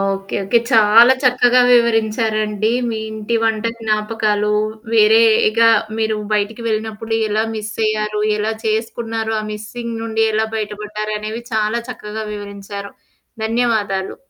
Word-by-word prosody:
Okay, 195 Hz, 0 st, -7 dB
okay. 235 Hz, +4 st, +3 dB
చాలా 225 Hz, +3 st, +7 dB
చక్కగా 250 Hz, 0 st, +4 dB
వివరించారండి. 220 Hz, -2 st, +1 dB, 0.2 s
మీ 220 Hz, -, -3 dB
ఇంటి 220 Hz, +1 st, -3 dB
వంట 225 Hz, 0 st, 0 dB
జ్ఞాపకాలు, 215 Hz, -1 st, 0 dB, 0.4 s
వేరేగా 225 Hz, +1 st, +5 dB, 0.3 s
మీరు 220 Hz, -1 st, 0 dB, 0.2 s
బయటికి 210 Hz, +2 st, -1 dB
వెళ్లినప్పుడు 220 Hz, 0 st, -3 dB, 0.2 s
ఎలా 215 Hz, +1 st, +1 dB
మిస్సయ్యారు? 215 Hz, 0 st, -2 dB, 0.2 s
ఎలా 215 Hz, +1 st, -1 dB
చేసుకున్నారు? 225 Hz, 0 st, -2 dB
ఆ -, -, -7 dB
మిస్సింగ్ 230 Hz, +2 st, -6 dB
నుంచి 225 Hz, 0 st, 0 dB
ఎలా 220 Hz, +1 st, +1 dB
బయటపడ్డారనేవి 215 Hz, +1 st, -4 dB
చాలా 215 Hz, +2 st, 0 dB
చక్కగా 220 Hz, -2 st, -6 dB
వివరించారు. 200 Hz, -1 st, -8 dB, 0.5 s
ధన్యవాదాలు. 220 Hz, -5 st, -1 dB
220 Hz, 110 wpm, -18 LUFS, 210-225 Hz, 0.5 s, చాలా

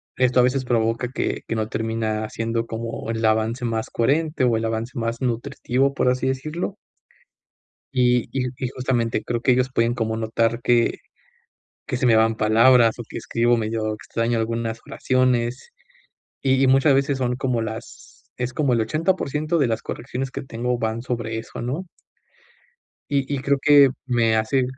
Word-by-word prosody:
esto 130 Hz, 0 st, +3 dB
a -, -, +6 dB
veces 130 Hz, +1 st, +1 dB
provoca 115 Hz, 0 st, 0 dB
que -, -, -2 dB
que 115 Hz, -, -2 dB
no 110 Hz, -1 st, -1 dB
termina 110 Hz, -1 st, -2 dB
siendo 115 Hz, 0 st, -2 dB
como 115 Hz, 0 st, -5 dB
el 115 Hz, 0 st, -3 dB
avance 110 Hz, +3 st, +1 dB
más 115 Hz, -1 st, -2 dB
coherente, 145 Hz, +3 st, +1 dB
o 120 Hz, -2 st, +3 dB
el 115 Hz, -, -2 dB
avance 115 Hz, +3 st, -3 dB
más 115 Hz, +1 st, -2 dB
nutritivo, 130 Hz, +2 st, 0 dB
por -, -, 0 dB
así 130 Hz, +1 st, 0 dB
decirlo 155 Hz, +9 st, -3 dB, 1.2 s
y 125 Hz, -1 st, +3 dB
y 125 Hz, -2 st, -1 dB
y 130 Hz, -, -2 dB
justamente 125 Hz, -3 st, 0 dB
creo 120 Hz, -1 st, -2 dB
que, 130 Hz, -, +3 dB
ellos 130 Hz, +1 st, +1 dB
pueden 115 Hz, -1 st, +1 dB
como 110 Hz, -2 st, -2 dB
notar 115 Hz, +1 st, 0 dB
que, 120 Hz, -1 st, +2 dB, 0.9 s
que 125 Hz, -, -2 dB
se 130 Hz, -, 0 dB
me 115 Hz, -2 st, +5 dB
van 110 Hz, 0 st, +3 dB
palabras, 115 Hz, +2 st, +5 dB
o 120 Hz, -, -6 dB
que -, -, -7 dB
escribo 120 Hz, +1 st, +1 dB
medio 110 Hz, -1 st, -2 dB
extraño 115 Hz, +2 st, -2 dB
algunas 115 Hz, 0 st, -2 dB
oraciones. 130 Hz, -, 0 dB, 0.7 s
Y 135 Hz, 0 st, +2 dB
y 135 Hz, -, +4 dB
muchas 135 Hz, +2 st, +5 dB
veces 140 Hz, 0 st, +1 dB
son 125 Hz, -1 st, -1 dB
como 125 Hz, -3 st, 0 dB
las 110 Hz, 0 st, -8 dB
es 125 Hz, 0 st, -3 dB
como 135 Hz, -3 st, +1 dB
el 115 Hz, -, +2 dB
80% 155 Hz, +3 st, 0 dB
de 140 Hz, -6 st, +3 dB
las 110 Hz, 0 st, -1 dB
correcciones 130 Hz, +2 st, -5 dB
que -, -, -5 dB
tengo, 125 Hz, -1 st, -2 dB
van 110 Hz, 0 st, -2 dB
sobre 115 Hz, -3 st, -3 dB
eso, 115 Hz, -, -8 dB
¿no? 145 Hz, +10 st, -3 dB, 1.2 s
y 140 Hz, 0 st, 0 dB
y -, -, -1 dB
creo 140 Hz, 0 st, +2 dB
que, 145 Hz, -2 st, +6 dB, 0.2 s
me 115 Hz, -3 st, +2 dB
hace 125 Hz, +4 st, +1 dB
120 Hz, 170 wpm, -23 LUFS, 115-130 Hz, 1.2 s, a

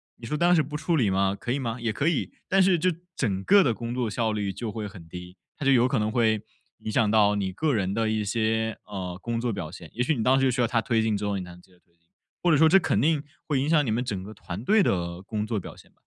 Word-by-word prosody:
你 115 Hz, -, -11 dB
说 135 Hz, -, -2 dB
当 175 Hz, +2 st, +4 dB
时 155 Hz, -, +3 dB
不 150 Hz, +2 st, -8 dB
处 160 Hz, +2 st, 0 dB
理 120 Hz, -10 st, +2 dB
吗？ 95 Hz, +1 st, +1 dB
可 120 Hz, -, -4 dB
以 135 Hz, -, 0 dB
吗？ 115 Hz, -3 st, -3 dB
也 115 Hz, -2 st, -2 dB
可 145 Hz, -, -1 dB
以， 170 Hz, -, 0 dB, 0.2 s
但 195 Hz, 0 st, +4 dB
是 185 Hz, -2 st, +3 dB
这 185 Hz, -, +2 dB, 0.3 s
整 95 Hz, -9 st, -1 dB
个 200 Hz, 0 st, +6 dB
的 130 Hz, -, +2 dB
工 115 Hz, +1 st, -5 dB
作 125 Hz, -3 st, -1 dB
效 110 Hz, 0 st, -1 dB
率 105 Hz, -2 st, -2 dB
就 110 Hz, +2 st, -5 dB
会 105 Hz, 0 st, -5 dB
很 95 Hz, -5 st, -12 dB
低， 90 Hz, +2 st, -10 dB, 0.2 s
它 145 Hz, -, -5 dB
就 135 Hz, -, +5 dB
有 125 Hz, -2 st, +5 dB
可 125 Hz, -3 st, 0 dB
能 105 Hz, -, 0 dB
会 110 Hz, -2 st, +2 dB, 0.4 s
影 -, -, -6 dB
响 110 Hz, -2 st, +2 dB
到 105 Hz, -1 st, +4 dB
你 100 Hz, -2 st, -2 dB
个 145 Hz, +8 st, 0 dB
人 100 Hz, -2 st, -1 dB
的 110 Hz, 0 st, 0 dB
一 110 Hz, -1 st, 0 dB
些， 110 Hz, +1 st, 0 dB
呃， 95 Hz, -3 st, -6 dB
工 115 Hz, -1 st, -2 dB
作 120 Hz, -1 st, -1 dB
表 95 Hz, -7 st, -5 dB
现。 85 Hz, -1 st, -11 dB
也 120 Hz, -, -3 dB
许 135 Hz, +5 st, +2 dB
你 115 Hz, -, -2 dB
当 130 Hz, +1 st, +4 dB
时 135 Hz, -1 st, +3 dB
需 125 Hz, 0 st, 0 dB
要 -, -, +4 dB
他 115 Hz, -1 st, +1 dB
推 115 Hz, +1 st, +1 dB
进 110 Hz, -2 st, +1 dB
之 105 Hz, -, -4 dB
后 100 Hz, -1 st, -1 dB
你 95 Hz, -, -4 dB
才 90 Hz, -, -10 dB
能 90 Hz, 0 st, -14 dB
接 95 Hz, -, -25 dB
着 90 Hz, -, -25 dB
推 85 Hz, -1 st, -39 dB
进， 85 Hz, -, -41 dB, 0.4 s
或 175 Hz, -, +2 dB
者 155 Hz, -, +5 dB
说 160 Hz, +2 st, +6 dB
这 195 Hz, +4 st, +6 dB
肯 -, -, 0 dB
定 155 Hz, -1 st, +2 dB, 0.2 s
会 145 Hz, -4 st, 0 dB
影 140 Hz, -, -1 dB
响 155 Hz, -3 st, +4 dB
你 115 Hz, -, -1 dB
们 115 Hz, +3 st, 0 dB
整 100 Hz, -7 st, -4 dB
个 105 Hz, -, -9 dB
团 100 Hz, 0 st, -7 dB
队 210 Hz, -, +4 dB
的 85 Hz, -, -1 dB
工 105 Hz, +2 st, -3 dB
作 110 Hz, -1 st, -2 dB
表 -, -, -9 dB
现 -, -, -18 dB
吧。 -, -, -35 dB
110 Hz, 330 characters per minute, -26 LUFS, 100-135 Hz, 0.4 s, 个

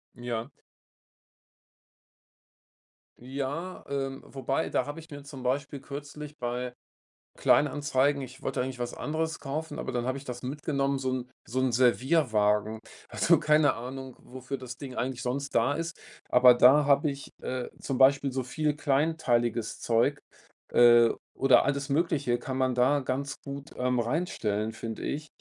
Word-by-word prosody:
Ja. 120 Hz, 0 st, -4 dB, 2.7 s
Ja, 140 Hz, +8 st, -5 dB
ähm, 135 Hz, -1 st, -3 dB
wobei, 135 Hz, 0 st, -2 dB
da -, -, 0 dB
habe 145 Hz, +3 st, -6 dB
ich 165 Hz, +1 st, -13 dB
mir 145 Hz, -2 st, -9 dB
zum 140 Hz, -2 st, -10 dB
Beispiel 140 Hz, +3 st, -2 dB
kürzlich 145 Hz, +2 st, -8 dB
bei 125 Hz, -1 st, -3 dB, 0.6 s
Kleinanzeigen 145 Hz, -1 st, +2 dB
ich 130 Hz, +1 st, -10 dB
wollte 135 Hz, -, -2 dB
eigentlich 130 Hz, -1 st, -5 dB
was 120 Hz, 0 st, -3 dB
anderes 160 Hz, +2 st, -2 dB
kaufen, 155 Hz, +3 st, -4 dB
aber -, -, -4 dB
dann 120 Hz, 0 st, -2 dB
habe 130 Hz, +1 st, -1 dB
ich 140 Hz, -, -10 dB
das 125 Hz, -2 st, -6 dB
mitgenommen, 140 Hz, 0 st, -1 dB
so 130 Hz, -1 st, -2 dB
'n 125 Hz, -1 st, -3 dB, 0.2 s
so 125 Hz, +4 st, -2 dB
'n 130 Hz, -1 st, +2 dB
Servierwagen. 115 Hz, -4 st, +2 dB, 0.3 s
Also, -, -, +4 dB
keine 150 Hz, -1 st, +4 dB
Ahnung, 130 Hz, +2 st, -7 dB
wofür 130 Hz, +2 st, -6 dB
das 125 Hz, -1 st, -8 dB
Ding 130 Hz, -2 st, -8 dB
eigentlich 125 Hz, +1 st, -2 dB
sonst 140 Hz, +3 st, -3 dB
da 120 Hz, +5 st, +3 dB
ist, 165 Hz, +1 st, -4 dB, 0.3 s
aber 125 Hz, 0 st, +7 dB
da 135 Hz, +5 st, +6 dB
habe 145 Hz, +1 st, +3 dB
ich, 140 Hz, 0 st, -9 dB
äh, 125 Hz, -1 st, -3 dB
zum 135 Hz, -2 st, -3 dB
Beispiel 135 Hz, +1 st, +5 dB
so 130 Hz, +1 st, -1 dB
viel 150 Hz, +4 st, -1 dB
kleinteiliges 135 Hz, -6 st, 0 dB
Zeug, 120 Hz, +5 st, +2 dB, 0.5 s
äh, 120 Hz, -1 st, +7 dB, 0.3 s
oder 130 Hz, -3 st, +5 dB
alles 140 Hz, 0 st, -1 dB
Mögliche 140 Hz, -5 st, +1 dB
kann 130 Hz, -1 st, -4 dB
man 130 Hz, -1 st, +1 dB
da 130 Hz, +4 st, +3 dB
ganz 135 Hz, +2 st, -3 dB
gut, 140 Hz, 0 st, -7 dB
ähm, 125 Hz, 0 st, +1 dB
reinstellen, 115 Hz, -, -1 dB
finde 115 Hz, -1 st, -6 dB
ich. 150 Hz, +2 st, -3 dB
135 Hz, 150 wpm, -28 LUFS, 125-145 Hz, 2.7 s, aber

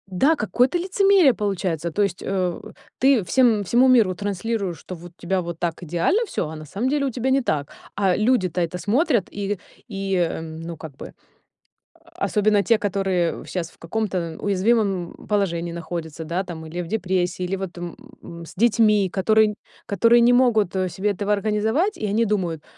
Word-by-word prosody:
у -, -, -4 dB
да, 315 Hz, -, +4 dB
какое-то 245 Hz, -, +1 dB
лицемерие, 375 Hz, -4 st, +4 dB
получается. 180 Hz, -5 st, -2 dB
То 205 Hz, -, -1 dB
есть, 190 Hz, -2 st, -2 dB
э, 185 Hz, -3 st, -1 dB, 0.4 s
ты 265 Hz, -4 st, +4 dB
всем 220 Hz, +2 st, +3 dB
всему 240 Hz, +7 st, +4 dB
миру 225 Hz, -8 st, +4 dB
транслируешь, 200 Hz, -1 st, -3 dB
что 185 Hz, -, -8 dB
вот 175 Hz, +1 st, -12 dB
у -, -, -27 dB
тебя 185 Hz, +1 st, 0 dB
вот 170 Hz, -1 st, -6 dB
так 170 Hz, +1 st, -3 dB
идеально 175 Hz, -, +1 dB
всё, 170 Hz, -, -2 dB
а 160 Hz, -, -7 dB
на 155 Hz, 0 st, -9 dB
самом 205 Hz, -, -2 dB
деле, 285 Hz, 0 st, +1 dB
у 270 Hz, -, -1 dB
тебя 250 Hz, +2 st, -2 dB
не 270 Hz, -, +3 dB
так. 145 Hz, -8 st, -2 dB, 0.2 s
А 195 Hz, -3 st, +2 dB
люди-то 210 Hz, -6 st, +1 dB
это 170 Hz, +1 st, -2 dB
смотрят, 235 Hz, -, +1 dB
и 200 Hz, -1 st, -3 dB, 0.3 s
и, 195 Hz, -5 st, -1 dB
ну, 165 Hz, +1 st, -7 dB
как 155 Hz, -3 st, -10 dB
бы, -, -, -9 dB, 1.0 s
особенно 210 Hz, -1 st, +2 dB
те, 225 Hz, +4 st, +3 dB
которые 190 Hz, -4 st, -1 dB
щас 170 Hz, -3 st, -4 dB
в -, -, -24 dB
каком-то 180 Hz, -3 st, -3 dB
уязвимом 200 Hz, -2 st, +1 dB
положении 175 Hz, -5 st, 0 dB
находятся, 165 Hz, -1 st, -6 dB
да, 170 Hz, +4 st, -2 dB
там, 165 Hz, -3 st, -8 dB
или 175 Hz, +3 st, -4 dB
в -, -, -7 dB
депрессии, 185 Hz, -3 st, -1 dB
или 190 Hz, +2 st, -2 dB
вот, 185 Hz, -2 st, -6 dB
м, 170 Hz, 0 st, -10 dB
с -, -, -12 dB
детьми, 215 Hz, -2 st, +3 dB
которые 215 Hz, +3 st, +3 dB, 0.3 s
которые 230 Hz, +4 st, +4 dB
не 240 Hz, +1 st, +5 dB
могут, 220 Hz, -7 st, +3 dB
э, 185 Hz, -1 st, 0 dB
себе 200 Hz, +4 st, -1 dB
этого 200 Hz, +2 st, -2 dB
организовать, 220 Hz, -, 0 dB
и 215 Hz, -, -5 dB
они 220 Hz, +3 st, +1 dB
думают: 175 Hz, -7 st, -1 dB
195 Hz, 180 wpm, -23 LUFS, 175-220 Hz, 1.0 s, не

